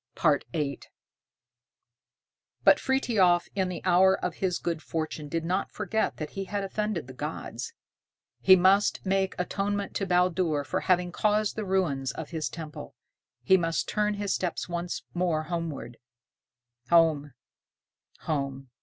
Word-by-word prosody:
VIII 150 -2 +1 1.8
But - - +7
Frithiof 215 -10 +2
in 190 -2 0
the 180 - -6
hour 190 +1 +5
of 180 - -3
his 185 -2 0
good 165 -2 -3
fortune 155 -2 -4
did 165 0 -2
not 185 +3 -1
forget 215 +1 -1
that 155 -1 -5
he 195 0 -4
had 200 +1 -3
offended 210 -3 -2
the 130 - -10
gods. 150 - -5 0.7
He 190 - +8
must 195 +3 +3
make 190 0 +1
atonement 200 +2 -2
to 195 - -2
Baldur 180 -4 +2
for 140 - -2
having 180 -1 +1
caused 210 +2 +1
the 215 - -3
ruin 185 -8 0
of 160 0 -7
his 160 -2 -2
temple. 155 - -8 0.5
He 190 +9 +6
must 165 -2 -1
turn 210 -1 0
his 200 -1 -1
steps 180 -3 -2
once 175 0 -4
more 175 -3 0
homeward. 160 -7 -4 0.9
Home! 155 -5 +4 0.9
Home! 135 -4 -3
175 Hz, 135 wpm, -28 LUFS, 155-195 Hz, 1.8 s, He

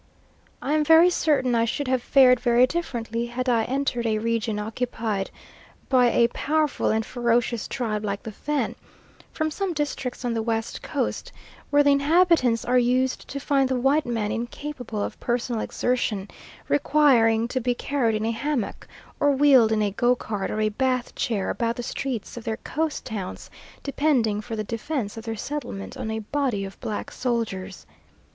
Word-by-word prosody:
I 290 - 0
am 305 0 +3
very 325 +3 +6
certain 285 -7 +2
I 230 -1 +3
should 270 +4 -2
have 255 -1 +1
fared 255 -1 +5
very 240 0 +4
differently 235 -7 -3
had 250 +2 -4
I 230 -3 +3
entered 255 -3 -1
a 215 -1 +1
region 225 -1 -1
occupied 220 -2 -2 0.6
by 255 -2 +5
a 235 0 +4
powerful 305 +3 0
and 220 0 +1
ferocious 235 -2 0
tribe 220 -5 -2
like 200 -1 -3
the 220 - -6
Fan, 295 +7 -2 0.6
from 315 -1 -2
some 385 +2 -2
districts 275 -4 -3
on 240 - 0
the 225 - -1
West 225 0 -2
Coast, - - -3 0.4
where 290 0 +5
the 285 - +5
inhabitants 285 -4 +3
are 250 +1 +3
used 255 +1 +1
to 280 - -5
find 275 -1 +1
the 260 -1 0
white 275 +3 +2
man 225 -3 -1
incapable 240 -2 -4
of - - -5
personal 240 -2 -1
exertion, 225 -5 -1 0.4
requiring 250 -6 +4
to 255 - -1
be 245 0 0
carried 240 -5 0
in 215 +1 -1
a 225 - +1
hammock, 250 0 -3 0.3
or 290 - +4
wheeled 270 -5 +5
in 215 -1 +2
a 205 - 0
go 240 +5 +2
cart 210 -5 -4
or 215 - -2
a 215 - +2
Bath 255 +2 -1
chair 210 -5 -1
about 230 -1 -1
the 245 - -5
streets 245 -3 -4
of 235 - -6
their 220 -1 -2
coast 315 0 -3
towns, 205 -5 -6 0.3
depending 260 -7 +1
for 225 +1 -6
the 215 - -2
defence 230 +1 -3
of 225 +1 -8
their 225 -1 -3
settlement 240 -7 -5
on 220 - -4
a 220 - -2
body 220 -2 -1
of 195 - -10
black 210 - -4
soldiers. 205 -6 -3
240 Hz, 175 wpm, -25 LUFS, 225-275 Hz, 0.6 s, very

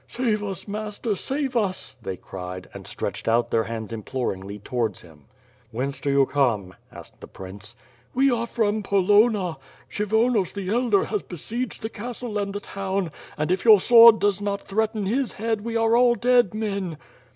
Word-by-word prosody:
"Save 225 -4 -1
us, 195 -1 -5
master, 210 +1 -3
save 270 +5 -2
us," 200 -5 -1
they 95 -4 -5
cried 90 0 -8
and - - -10
stretched - - -5
out 115 +1 +2
their 115 -1 +2
hands 115 0 -5
implor 115 +1 -3
ingly 100 +2 -9
towards 115 -6 -2
him. 75 -4 -18 0.4
"Whence 130 +4 -3
do 145 - -2
you 140 0 +4
come?" 115 -10 0 0.2
asked - - -13
the - - -9
prince. 95 +2 -10 0.4
"We 270 +1 +4
are 235 -1 -1
from 215 -2 0
Polonna. 200 -2 +3 0.3
Kshyvonos 220 0 +1
the 195 -2 -4
elder 235 -4 +2
has 210 -3 -2
besieged 230 - -5
the 220 - -2
castle 230 -1 -5
and 200 -1 -2
the 205 - -4
town, 195 -3 -3 0.3
and 155 +3 -1
if 185 - 0
your 220 -3 +8
sword 230 +2 +8
does 205 -1 +1
not 200 -1 -2
threaten 215 0 -1
his 250 +6 0
head 225 0 -2
we 230 +1 -2
are 225 0 +3
all 240 0 +5
dead 245 -4 +3
men." 200 -6 -3
200 Hz, 175 wpm, -24 LUFS, 140-225 Hz, 0.4 s, your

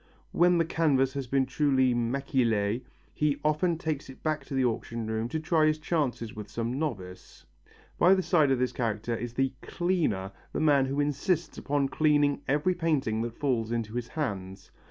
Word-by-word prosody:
When 175 0 +4
the 165 - +2
canvas 140 -5 +2
has 140 -2 -4
been 135 +2 +2
duly 130 -2 +2
maquillé 120 -3 0 0.3
he 150 -1 0
often 160 +3 +2
takes 155 -4 -3
it 130 - -13
back 155 -1 -1
to 140 - -5
the 130 -1 +2
auction 115 -1 -2
room 110 +1 -2
to 160 - -2
try 155 0 +2
his 155 0 +2
chances 145 -8 -2
with 105 -1 -8
some 120 +4 -3
novice. 95 -12 -6 0.5
By 185 +3 +6
the 190 - 0
side 155 -6 +3
of 135 - +3
this 125 0 0
character 115 -1 -2
is 120 +1 -5
the 135 0 +1
"cleaner," 165 - -1 0.2
the - - -1
man 145 -3 +4
who 140 +2 -2
insists 155 +4 0
upon 140 -1 0
cleaning 145 -2 +2
every 150 +7 +2
painting 150 -11 0
that 115 0 -4
falls 120 -6 0
into 115 -2 -2
his 120 -1 -3
hands. 95 -11 -5
135 Hz, 180 wpm, -28 LUFS, 115-155 Hz, 0.5 s, By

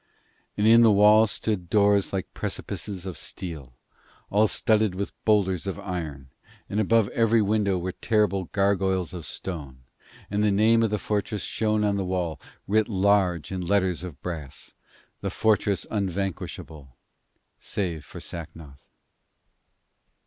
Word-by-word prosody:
And 105 - +1
in 115 +1 +7
the 115 - +7
wall 105 +2 +6
stood 100 -4 -3
doors 100 -1 +3
like 95 -2 -4
precipices 95 -3 -4
of 95 -4 -6
steel, 75 -9 -6 0.6
all 105 +2 +4
studded 110 -3 +1
with 100 +1 -4
boulders 100 -4 +2
of 95 - -3
iron, 75 -8 -6 0.4
and 105 - -2
above 110 0 +3
every 115 0 +3
window 105 -2 +1
were 90 +1 -3
terrible 105 -3 0
gargoyles 95 -2 0
of 85 -5 -7
stone; 70 -9 -7 0.5
and 105 +1 +1
the 105 - +4
name 110 +3 +4
of 115 - +2
the 105 - 0
fortress 105 +1 -2
shone 110 -1 0
on 100 -1 +1
the 100 - -1
wall, 90 -5 -2 0.3
writ 110 +2 +2
large 95 -4 +2
in 95 -1 -3
letters 95 -1 +1
of 85 -7 -8
brass: 80 -7 -7 0.5
'The - - -3
Fortress 105 -3 +1
Unvanquishable, 90 - -4 0.6
Save 85 -6 -3
For - - -10
Sacnoth.' 80 -4 -9
95 Hz, 140 wpm, -25 LUFS, 85-105 Hz, 0.6 s, in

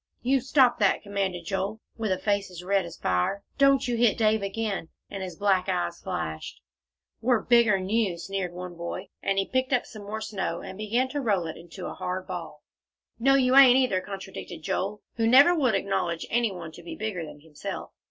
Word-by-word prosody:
"You 265 +2 +3
stop 260 -1 +4
that!" 200 -2 +2
commanded 195 -4 -2
Joel, 195 +4 -2 0.2
with 220 -3 -2
a 185 - +2
face 200 -1 0
as 180 -1 -9
red 195 0 +1
as 170 - -9
fire. 90 - 0 0.2
"Don't 275 -1 +5
you 240 -1 0
hit 230 -2 +3
Dave 220 -1 +3
again," 200 -3 -3 0.2
and 195 - -5
his 185 -1 -5
black 195 -3 +2
eyes 85 0 -1
flashed. 80 0 -4 0.6
"We're 240 -1 +2
bigger'n 220 -6 +4
you," 205 -4 +1
sneered 190 0 -3
one 180 0 -7
boy, 170 0 -6
and 195 - 0
he 195 - +2
picked 260 +3 -1
up 250 - +2
some 215 - -11
more 210 +2 -5
snow, 190 -6 -3
and - - -8
began 220 +5 0
to 290 +1 -2
roll 200 -8 +1
it 160 - -5
into 175 +2 -9
a - - -5
hard 185 +1 -4
ball. 170 -5 -7 0.6
"No, 270 +3 +4
you 260 -1 +3
ain't, 265 -2 +9
either," 250 -8 +2
contradicted 190 -4 -8
Joel, 200 +6 -2
who 225 -1 +2
never 275 +8 +7
would 265 - +2
acknowledge 175 -4 -1
any 235 -2 +2
one 170 -4 -7
to 165 - -12
be 170 - -8
bigger 210 -6 -3
than 150 -2 -10
himself. 160 +5 -7
200 Hz, 200 wpm, -27 LUFS, 180-230 Hz, 0.6 s, ain't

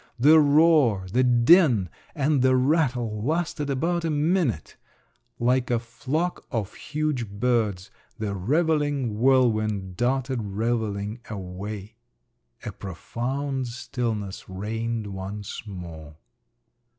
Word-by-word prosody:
The 150 +6 +7
roar, 145 - +4
the 130 - +4
din, 125 - +5 0.3
and 145 -2 +2
the 130 0 +4
rattle 130 -6 +1
lasted 155 0 -1
about 165 +6 0
a 165 - 0
minute…. 150 - 0 0.6
Like 125 +1 +1
a 120 - +2
flock 130 +9 -3
of 110 -7 -3
huge 150 -7 -2
birds 105 -3 0 0.3
the 105 -2 -3
revelling 145 - 0
whirlwind 110 -7 +2
darted 130 0 0
revelling 105 0 -2
away. 100 +2 -7 0.7
A - - -3
profound 130 - -4
stillness 115 -5 -4
reigned 110 +4 -3
once 100 +1 -6
more. 85 -6 -9
120 Hz, 100 wpm, -25 LUFS, 105-140 Hz, 0.7 s, The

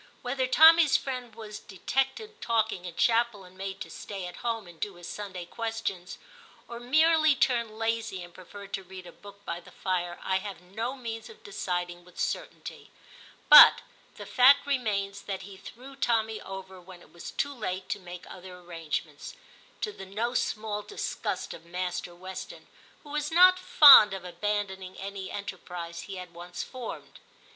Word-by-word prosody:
Whether 255 +1 -1
Tommy's 320 +2 +7
friend 250 -4 -6
was 215 -2 -8
de 195 - -14
tected 270 - -2
talking 220 -5 0
in 175 -2 -7
chapel 230 -3 +2
and 180 0 -16
made 195 0 -6
to - - -6
stay 195 -3 -7
at 180 - -8
home 230 -3 -3
and 170 -2 -15
do 205 -3 -4
his 175 0 -11
Sunday 190 -4 -6
questions, 225 -4 -5 0.5
or 235 0 -8
merely 310 +4 +4
turned 235 -5 0
lazy 225 -4 -2
and 175 0 -13
preferred 200 +3 -12
to 195 - -3
read 185 0 -11
a 175 - -10
book 200 +2 -15
by 170 - -4
the 175 - -16
fire, 175 -2 -3
I 190 - +1
have 195 -1 -7
no 220 +8 -5
means 230 -3 -7
of 455 0 -15
deciding 175 - -4
with 180 0 -16
certainty; - - -5 0.6
but - - +10 0.3
the - - -9
fact 270 +3 +5
remains 205 -8 -1
that 195 -1 -5
he 195 +1 -11
threw 255 +7 -12
Tommy 225 -4 0
over 190 -1 -9
when 180 -1 -14
it - - -22
was 170 - -8
too 285 0 -2
late 185 -6 -4
to - - -2
make 180 -1 -10
other 180 -1 -11
arrangements, 165 - -6 0.5
to 425 - -2
the 195 - -11
no 225 +5 -2
small 215 -3 -2
disgust 410 - -4
of 165 - -11
Master 180 0 -4
Weston, 185 +2 -9 0.4
who 295 - -12
was 300 0 -2
not 365 +2 +7
fond 275 - +9
of 185 -1 -8
abandon 195 +2 -2
ing 185 0 -10
any 195 -1 -6
enterprise 180 -4 -7
he 195 - -7
had 180 -2 -9
once 175 +1 -7
formed. 255 -2 -9
200 Hz, 175 wpm, -28 LUFS, 180-240 Hz, 0.6 s, but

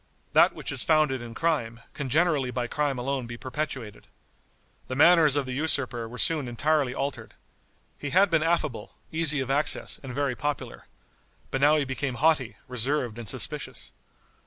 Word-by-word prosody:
That - - +6
which - - -5
is - - +1
founded 155 -5 +2
in 115 -1 -9
crime, 120 -8 -1
can 140 -3 -5
generally 150 -2 +2
by 125 0 -2
crime 145 +1 -1
alone 130 0 -2
be 120 0 -7
perpetuated. 130 -5 -5 0.8
The 130 - -4
manners 155 -1 +6
of 145 -2 0
the 130 - -5
usurper 130 -5 0
were 125 - -9
soon 150 -3 +2
entirely 140 +1 0
altered. 140 +1 -4 0.6
He 145 - -4
had 190 +4 +4
been 165 -2 +3
affable, 155 -9 -1 0.2
easy 155 -3 +1
of 130 0 -3
access, 145 +2 +1
and 135 - -7
very 140 +1 -1
popular. 140 - -4 0.6
But 135 - -1
now 150 +2 +5
he 145 - 0
became 130 -1 -3
haughty, 140 -3 +1
reserved 125 -1 -1
and 115 -4 -4
suspicious. - - -2
140 Hz, 165 wpm, -26 LUFS, 125-155 Hz, 0.8 s, That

